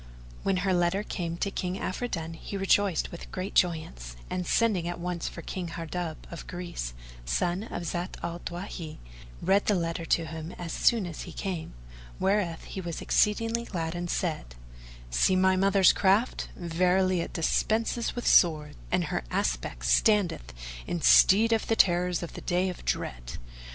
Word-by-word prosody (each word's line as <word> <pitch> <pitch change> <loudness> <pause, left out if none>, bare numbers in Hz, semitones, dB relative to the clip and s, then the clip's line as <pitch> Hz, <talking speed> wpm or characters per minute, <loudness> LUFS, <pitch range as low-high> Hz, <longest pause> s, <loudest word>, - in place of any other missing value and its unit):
When 195 -1 +1
her 190 - +3
letter 175 +3 +1
came 170 -5 -4
to 200 - -1
King 180 -2 -2
Afridun, 175 -7 -3
he 195 +4 -6
rejoiced 195 -2 +2
with 170 - -9
great 185 +1 -4
joyance; 110 - 0 0.2
and, 180 -1 -2
sending 205 -7 +2
at 175 0 -4
once 175 -1 -3
for 170 - -7
King 180 -2 -4
Hardub 165 0 -4
of 170 - -8
Greece, 175 - -5 0.3
son 175 - 0
of 175 - -5
Zat 175 +2 -3
al 170 0 -3
Dawahi, 175 -3 -6 0.5
read 195 +2 +3
the 210 - +4
letter 170 -1 -2
to 165 0 +2
him 160 +2 -7
as 170 -2 -6
soon 230 -5 +3
as 170 -3 -6
he 175 - -7
came, 175 - -5 0.4
whereathe 190 -3 -1
was 170 -2 -4
exceeding 225 +2 +2
glad 165 -6 -3
and 175 0 -4
said, 155 - -2 0.6
"See - - +3
my 190 0 +4
mother's 195 0 +5
craft; 200 +5 +2
verily 180 +2 +2
it - - -5
dispenseth 225 +7 0
with 245 - -4
swords, 150 -4 +4
and 180 0 +2
her 150 - -2
aspect - - -2
standeth 170 - +2 0.4
in 175 -1 -2
stead 225 +4 +6
of 225 - 0
the 225 - +2
terrors 180 -3 +3
of 170 - -6
the - - -8
Day 180 +1 +1
of 180 - -7
Dread." - - -3
175 Hz, 165 wpm, -28 LUFS, 165-190 Hz, 0.6 s, stead